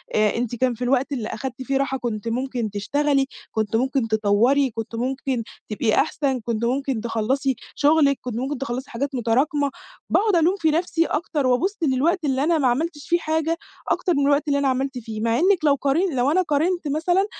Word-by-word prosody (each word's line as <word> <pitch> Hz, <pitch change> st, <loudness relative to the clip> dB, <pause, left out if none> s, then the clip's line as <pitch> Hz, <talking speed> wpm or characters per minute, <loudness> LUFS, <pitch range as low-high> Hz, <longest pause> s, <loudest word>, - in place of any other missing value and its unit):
أنتِ 215 Hz, +3 st, +1 dB
كان 250 Hz, +1 st, +1 dB
في 235 Hz, -, -13 dB
الوقت 265 Hz, +2 st, +1 dB
اللي 240 Hz, -6 st, -2 dB
أخدتِ 265 Hz, -2 st, -5 dB
فيه 270 Hz, +1 st, 0 dB
راحة 270 Hz, -1 st, 0 dB
كنتِ 230 Hz, -4 st, -4 dB
ممكن 245 Hz, -1 st, -2 dB
تشتغلي، 275 Hz, +7 st, +1 dB, 0.3 s
كنتِ 220 Hz, 0 st, -1 dB
ممكن 260 Hz, 0 st, +1 dB
تطوّري، 220 Hz, +6 st, +3 dB
كنت 225 Hz, +1 st, -6 dB
ممكن 255 Hz, 0 st, -2 dB, 0.3 s
تبقي 215 Hz, +1 st, +1 dB
أحسن، 275 Hz, -3 st, +1 dB
كنتِ 230 Hz, 0 st, -2 dB
ممكن 265 Hz, -1 st, -1 dB
تخلصي 235 Hz, +4 st, 0 dB, 0.2 s
شغلِك، 290 Hz, -2 st, +4 dB
كنتِ 245 Hz, -3 st, -5 dB
ممكن 265 Hz, +4 st, -2 dB
تخلصي 260 Hz, 0 st, -4 dB
حاجات 275 Hz, +3 st, -3 dB
متراكمة." 275 Hz, +5 st, +1 dB, 0.4 s
باقعد 420 Hz, -1 st, +3 dB
ألوم 340 Hz, +3 st, +3 dB
في 320 Hz, -2 st, +2 dB
نفسي 330 Hz, +1 st, +1 dB
أكتر، 300 Hz, -4 st, -1 dB
وأبُص 350 Hz, +12 st, +1 dB
للوقت 310 Hz, +5 st, +1 dB
اللي 270 Hz, -1 st, +1 dB
أنا 330 Hz, +2 st, +3 dB
ما 280 Hz, -4 st, +2 dB
عملتش 295 Hz, +4 st, -2 dB
فيه 345 Hz, -, +3 dB
حاجة 320 Hz, 0 st, 0 dB, 0.3 s
أكتر 360 Hz, -, +1 dB
من 280 Hz, -, +2 dB
الوقت 285 Hz, +2 st, +2 dB
اللي 280 Hz, -1 st, +2 dB
أنا 280 Hz, -, +1 dB
عملت 265 Hz, 0 st, -1 dB
فيه، 220 Hz, -2 st, -6 dB
مع 230 Hz, 0 st, +1 dB
إنِّك 365 Hz, -1 st, +3 dB
لو 285 Hz, -2 st, +5 dB
قار 275 Hz, +1 st, 0 dB, 0.2 s
لو 255 Hz, +3 st, +2 dB
أنا 370 Hz, +4 st, +3 dB
قارنت 335 Hz, +1 st, 0 dB
مثلًا 350 Hz, +6 st, +1 dB
270 Hz, 190 wpm, -23 LUFS, 240-300 Hz, 0.4 s, لو